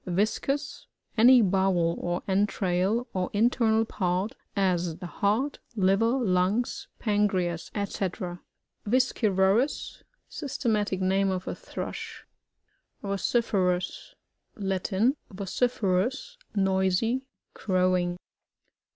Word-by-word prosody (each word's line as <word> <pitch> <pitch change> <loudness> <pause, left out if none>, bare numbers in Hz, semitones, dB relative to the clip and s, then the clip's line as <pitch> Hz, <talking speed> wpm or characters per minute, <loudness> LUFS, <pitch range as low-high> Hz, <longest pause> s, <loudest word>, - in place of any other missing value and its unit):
ViBCUs. 220 +10 -1
— - - -44
Any 240 +1 +7
bowel 185 -3 +2
or 175 0 -2
entrail, 195 +2 +1
or 185 -1 -1
in 225 +4 +4
ternal 225 -2 +2
part,'as 180 -2 -1
the 180 - -8
heart, 215 +10 0 0.2
liver 210 +5 +3
lungs, 200 +1 0
pancreas, 190 -6 0
&c 205 - 0 1.1
VisciYORDS. 220 -1 +1
— - - -50
Systematic 215 - -1
name 195 +1 +2
of 185 -1 -3
a - - -2
Thrush. - - -7 0.8
VociFERas. 195 -3 0 0.4
Latin. 195 +6 0
Vociferous, 210 - -1 0.2
noisy, 195 +5 +1 0.3
crowing. 185 -2 +1
195 Hz, 90 wpm, -27 LUFS, 185-230 Hz, 1.1 s, Any